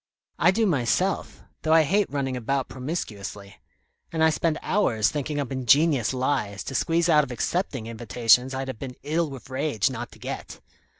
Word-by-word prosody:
I 175 - +5
do 220 +4 +2
myself 180 - 0 0.2
though 160 - +2
I 160 - +6
hate 195 +6 +1
running 135 -2 -2
about 130 +2 -1
promiscuously; 105 - -6 0.5
and 160 -1 0
I 160 - +5
spend 155 0 0
hours 115 - +2
thinking 145 0 -3
up 140 -2 -3
ingenious 135 0 +3
lies 130 -6 -1
to - - -6
squeeze 165 +5 +1
out 150 -3 +5
of 140 - -6
accepting 130 - -2
invitations 120 +2 +2
I'd 135 0 -3
have 130 - -6
been 130 -2 -6
ill 160 +2 0
with 135 -1 -10
rage 130 -6 0
not - - -6
to - - -15
get. - - -7
135 Hz, 175 wpm, -25 LUFS, 125-160 Hz, 0.5 s, I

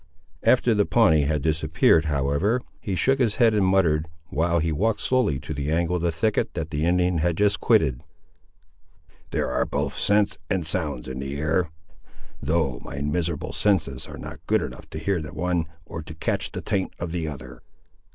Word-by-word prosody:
After 125 -2 +4
the 105 -1 +2
Pawnee 80 -11 +4
had 75 -1 0
disappeared, 80 +1 +3
however, 75 - +1 0.2
he 95 - -3
shook 135 +8 +2
his 115 -5 +2
head 115 -2 +4
and 105 -2 +2
muttered, 85 -5 +2 0.2
while 85 +3 +1
he 80 0 +1
walked 110 +8 +1
slowly 125 - +1
to 80 - -5
the 70 0 -3
angle 85 +2 +1
of - - -4
the 85 0 +1
thicket 100 +7 0
that 80 -2 -4
the 75 +1 -1
Indian 90 0 +2
had 85 +1 0
just 105 0 +2
quitted— 80 - +3 1.3
"There - - -1
are 65 0 +1
both - - -2
scents 105 -3 +2
and 95 -4 0
sounds 75 -7 -2
in 65 0 -5
the 70 +1 -4
air, 80 +3 0 0.7
though 75 -4 0
my 70 - -6
miserable 80 +2 -2
senses 80 -11 0
are - - -9
not - - -8
good - - +2
enough - - -8
to - - -7
hear 90 +2 -1
the 75 0 -8
one, 85 0 0 0.2
or 80 - -6
to 80 +1 -10
catch 80 - -2
the - - -5
taint 95 -2 -1
of 85 -1 -4
the 85 -2 -2
other." 75 -4 -8
80 Hz, 190 wpm, -24 LUFS, 75-95 Hz, 1.3 s, After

